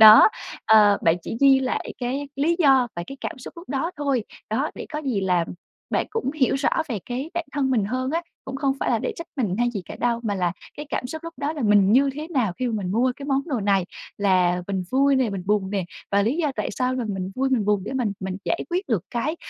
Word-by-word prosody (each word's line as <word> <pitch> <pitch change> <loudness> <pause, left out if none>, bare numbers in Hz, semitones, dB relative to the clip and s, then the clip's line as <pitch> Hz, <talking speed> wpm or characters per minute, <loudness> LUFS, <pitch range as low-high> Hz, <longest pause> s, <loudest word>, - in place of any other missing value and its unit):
Đó, 215 0 +11 0.4
ờ, 210 -2 +6
bạn 165 0 +4
chỉ - - -5
ghi 275 -1 +7
lại 255 - -2
cái 270 +3 -2
lý 330 +5 +2
do 270 -6 +5
và 170 - -2
cái 275 - -8
cảm - - -5
xúc 250 - -9
lúc 340 - -11
đó 280 +5 -1
thôi. 275 -6 0 0.3
Đó, 265 +8 0
để - - -7
có 300 - -2
gì 240 -8 0
là 180 -3 +2 0.5
bạn - - +1
cũng 450 - -1
hiểu 270 -4 +2
rõ 270 +1 +1 0.2
về 230 -6 -2
cái 260 +6 -4
bản 345 -1 -1
thân 275 -3 0
mình 220 -6 +2
hơn 255 +5 -2
á, 335 +2 0 0.2
cũng 265 0 -5
không 275 -1 +1
phải - - 0
là 230 - +2
để - - -2
trách 335 - -7
mình 210 -7 0
hay 240 0 +2
gì 200 -6 -4
cả - - -8
đâu, 235 -1 +1
mà 205 -3 -1
là 180 -2 0 0.2
cái 295 0 -6
cảm 250 - -2
xúc 315 +5 -7
lúc 335 - -7
đó 285 +2 -2
là 295 -5 -4
mình 205 -1 +5
như 275 +2 +5
thế 305 +3 -6
nào 255 - +1
khi 255 - 0
mà - - -2
mình 180 +1 -2
mua 250 +3 +2
cái 280 - -8
món 275 -1 +1
đồ 260 -8 -1
này, 195 -2 +2 0.3
là 180 -3 +3
mình 190 -2 -1
vui 275 +1 +4
nè, 255 -5 +2
mình 190 -2 -4
buồn 200 -2 +1
nè, 195 -3 -1 0.3
và 200 0 +4
lý 240 +9 +1
do 305 -5 0
tại - - -1
sao 255 0 0
là 250 - -2
mình 190 -1 -3
vui 265 +1 0
mình 240 -5 +2
buồn 205 -2 +2
để - - -5
mình 240 -6 0
mình 190 0 -3
giải 340 - 0
quyết 365 +2 -1
được 220 -9 +1
cái 280 +8 -1
250 Hz, 270 wpm, -24 LUFS, 205-275 Hz, 0.5 s, Đó